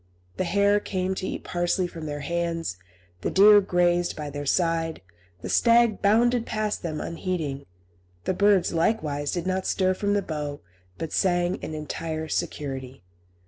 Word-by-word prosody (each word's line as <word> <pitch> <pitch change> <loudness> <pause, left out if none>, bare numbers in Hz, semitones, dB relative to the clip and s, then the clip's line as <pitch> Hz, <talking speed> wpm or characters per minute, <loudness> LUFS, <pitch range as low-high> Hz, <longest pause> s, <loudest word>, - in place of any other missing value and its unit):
The 185 - 0
hare 200 +3 +3
came 190 -2 -2
to 190 - -4
eat - - -5
parsley 175 +1 0
from 165 -3 -7
their 145 0 -4
hands, 165 - -2 0.5
the - - -1
deer 205 +1 +7
grazed 175 -2 +1
by 150 -2 -5
their 145 0 -5
side, 165 - 0 0.4
the - - -4
stag 235 -2 +4
bounded 235 +3 +3
past 215 -1 -2
them 155 -3 -4
unheeding; 165 -6 -4 0.6
the - - 0
birds, 200 -2 +3
likewise, 155 -6 0
did 175 -1 -3
not 185 0 -1
stir 185 -1 +2
from 205 +2 0
the 200 - +1
bough, 150 -2 -4 0.4
but 160 - -5
sang 175 -1 +1
in 155 - -6
entire 155 +1 -4
security. 135 -5 -4
175 Hz, 155 wpm, -25 LUFS, 155-200 Hz, 0.6 s, deer